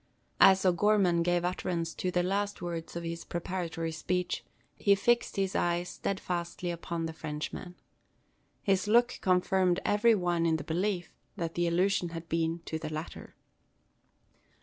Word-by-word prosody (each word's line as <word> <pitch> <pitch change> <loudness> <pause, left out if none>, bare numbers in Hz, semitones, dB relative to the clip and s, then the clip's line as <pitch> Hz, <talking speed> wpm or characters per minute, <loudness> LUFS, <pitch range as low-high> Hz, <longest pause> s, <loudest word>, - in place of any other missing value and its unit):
As 190 0 +7
O'Gorman 185 -1 +3
gave 175 0 +1
utterance 175 -2 -2
to 185 - -2
the 180 0 +1
last 200 +2 -1
words 170 -2 -5
of 170 - -4
his 170 0 -4
preparatory 170 -2 -3
speech, 180 -1 -2 0.3
he 200 -1 +4
fixed 240 +4 +1
his 195 -1 -1
eyes 175 +1 0
steadfastly 175 -2 -3
upon 170 -1 -4
the 160 - -4
Frenchman. 160 +3 -6 0.9
His 195 0 +2
look 240 +3 +3
confirmed 185 -1 +2
every 220 +2 +4
one 175 -3 +1
in 160 - +3
the 155 - -3
belief 175 +2 -2 0.2
that 165 -1 -3
the 175 0 +1
allusion 180 +1 +1
had 165 0 -7
been 165 +1 0
to 160 - -3
the 155 -1 -5
latter. 155 +2 -7
175 Hz, 150 wpm, -30 LUFS, 165-190 Hz, 0.9 s, As